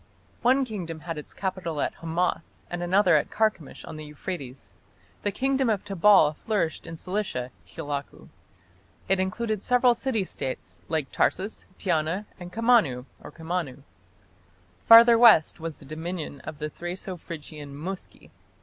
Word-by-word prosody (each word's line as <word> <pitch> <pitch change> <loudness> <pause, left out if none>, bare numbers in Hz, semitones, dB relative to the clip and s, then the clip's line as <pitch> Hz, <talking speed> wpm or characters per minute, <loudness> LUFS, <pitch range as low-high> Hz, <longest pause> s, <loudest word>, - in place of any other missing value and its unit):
One 260 +2 +4
kingdom 175 -9 -6
had 165 -2 -5
its 150 - -11
capital 185 -5 -3
at - - 0
Hamath 165 0 0 0.3
and 175 0 -3
another 180 -1 +4
at 145 - -1
Carchemish 215 -9 -1
on - - -8
the 155 - -7
Euphrates. 140 - -7 0.5
The 205 - -1
kingdom 265 +3 +1
of 210 -4 0
Tabal 195 -5 +5
flourished 175 -3 -2
in 165 0 -7
Cilicia 180 -10 -3 0.2
(Khilakku); 145 +8 -6 0.8
it 195 0 +2
included 215 +3 -1
several 250 +1 +4
city 235 -4 -1
States 130 - -6
like 155 -4 -2
Tarsus, 200 +4 0
Tiana, 170 +2 0
and 175 0 -8
Comana 225 - +3 0.2
(Kammanu). 160 -5 -5 1.0
Farther 230 0 +9
west 215 -10 +6
was 160 -2 -5
the - - -14
dominion 155 -1 -5
of 155 -1 -6
the 150 0 -4
Thraco 180 +3 -5
Phrygian 150 -3 -9
Muski. 180 +6 -8
175 Hz, 140 wpm, -26 LUFS, 155-210 Hz, 1.0 s, Farther